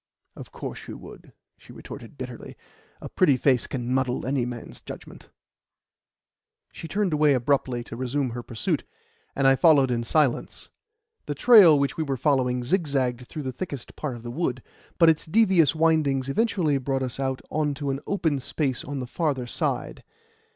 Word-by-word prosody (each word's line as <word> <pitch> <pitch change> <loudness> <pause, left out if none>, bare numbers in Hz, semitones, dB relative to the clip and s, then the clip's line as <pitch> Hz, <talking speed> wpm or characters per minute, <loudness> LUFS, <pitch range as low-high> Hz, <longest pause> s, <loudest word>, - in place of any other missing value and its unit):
"Of - - -11
course - - -7
you - - -7
would," - - -13 0.3
she - - -16
retorted - - -11
bitterly. - - -8 0.4
"A - - -6
pretty 150 -9 +3
face 130 -2 +2
can 125 -1 -3
muddle 130 -1 0
any 130 -2 0
man's 120 -2 -8
judgment." - - -11 1.4
She 165 - -8
turned 195 0 0
away 150 -2 +4
abruptly 125 -1 0
to 115 - -9
resume 130 +1 -2
her 120 +1 -5
pursuit, 115 -3 -2 0.5
and 135 - 0
I 135 0 +6
followed 140 -4 +5
in 120 -1 0
silence. 140 +1 0 0.6
The - - -3
trail 200 -11 +7
which 140 -1 -1
we 160 - 0
were 135 -3 -2
following 125 -2 +1
zigzagged 130 -6 0
through 155 - -6
the 130 -1 -4
thickest 140 -5 -7
part 145 -5 -4
of 115 - -11
the 120 - -6
wood, 130 -3 -2 0.3
but 165 - +5
its 160 -1 +3
devious 185 -5 +4
windings 155 -5 +2
eventually 170 -5 +1
brought 135 0 -1
us 130 0 -4
out 130 -1 -1
on 150 -2 0
to 140 -1 -3
an 135 - -3
open 160 -8 0
space 135 -1 -2
on 140 -1 -5
the - - -4
farther 135 -1 -2
side. 120 - -3
135 Hz, 170 wpm, -25 LUFS, 125-155 Hz, 1.4 s, trail